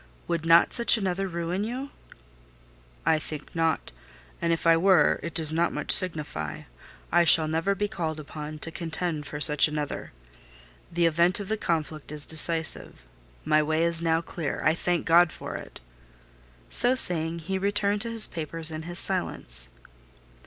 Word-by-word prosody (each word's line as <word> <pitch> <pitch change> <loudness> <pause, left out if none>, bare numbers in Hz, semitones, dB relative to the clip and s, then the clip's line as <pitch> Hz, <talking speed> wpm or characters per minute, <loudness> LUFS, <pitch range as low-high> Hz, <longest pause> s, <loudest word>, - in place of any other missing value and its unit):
Would 165 -1 -2
not 165 +1 +5
such 235 -1 +6
another 195 -1 -2
ruin 170 +2 -3
you?" 255 +5 -5 1.1
"I 155 - +3
think 150 0 -8
not; 165 -1 -1 0.5
and 170 - 0
if 165 - -2
I 165 0 +6
were, 175 -2 +3
it 170 -1 -7
does 160 -2 +4
not 170 +2 +1
much - - -3
signify; 150 - +1 0.5
I 175 +1 +4
shall 160 -1 +6
never 165 +5 -1
be 205 +2 -2
called 160 -6 -4
upon 150 0 -8
to 165 - -7
contend 160 -2 -4
for 150 - -6
such 150 +1 +4
another. 150 -1 -5 0.8
The 170 0 +1
event 170 +3 +2
of 200 -1 -7
the 220 - 0
conflict 155 -6 -3
is 150 -1 -4
decisive: 160 - -1 0.4
my 155 0 +3
way 155 +2 0
is 170 -1 +3
now 165 -1 +1
clear; 165 -3 -5
I 155 - +4
thank 175 0 -2
God 170 0 +5
for - - -8
it!" - - -9 0.9
So 245 - +4
saying, 170 -8 +4
he 190 +4 -4
returned 205 +1 0
to 230 - -2
his 225 -1 +3
papers 165 0 -5
and 155 0 -7
his 175 0 -5
silence. - - -2
165 Hz, 165 wpm, -26 LUFS, 155-180 Hz, 1.1 s, such